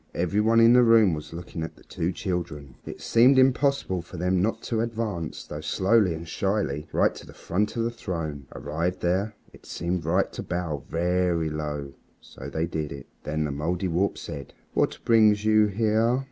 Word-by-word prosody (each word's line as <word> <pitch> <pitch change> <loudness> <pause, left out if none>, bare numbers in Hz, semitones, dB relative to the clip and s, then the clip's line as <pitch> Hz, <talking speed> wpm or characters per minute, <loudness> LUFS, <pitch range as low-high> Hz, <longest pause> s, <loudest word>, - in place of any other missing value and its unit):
Every 90 +4 +1
one 115 +1 +4
in 115 +1 +7
the 125 - +7
room 115 -6 +5
was 75 -1 -6
looking 85 0 -7
at 80 - -5
the - - -19
two 85 +2 -2
children, 85 -8 -4
and - - -7
it - - -17
seemed 125 +4 +5
impossible 130 -7 +2
for 90 +1 -11
them 90 +1 +1
not 110 +4 -1
to 115 -2 -1
advance, 110 -8 -3
though 75 0 -7
slowly 95 +2 +2
and 85 +1 -8
shyly, 95 -6 -1
right - - +2
to - - -11
the - - -13
front 105 +4 -1
of 115 - +1
the 115 - -1
throne. 80 - -5
Arrived 85 +5 -3
there, 95 +5 0 0.2
it - - -17
seemed 85 0 -2
right 90 +5 +1
to - - -5
bow, 85 -5 -3
very 85 -1 +1
low. 75 -2 -4 0.3
So 65 - -10
they 80 +3 -1
did 80 -3 -4
it. 70 - -8 0.2
Then 75 +1 -1
the 75 - -2
Mouldiwarp 85 +5 -1
said 70 -1 -8 0.2
"What - - +1
brings 110 -2 +4
you 110 -1 +5
here?" 110 +4 +2
90 Hz, 190 wpm, -26 LUFS, 80-110 Hz, 0.3 s, in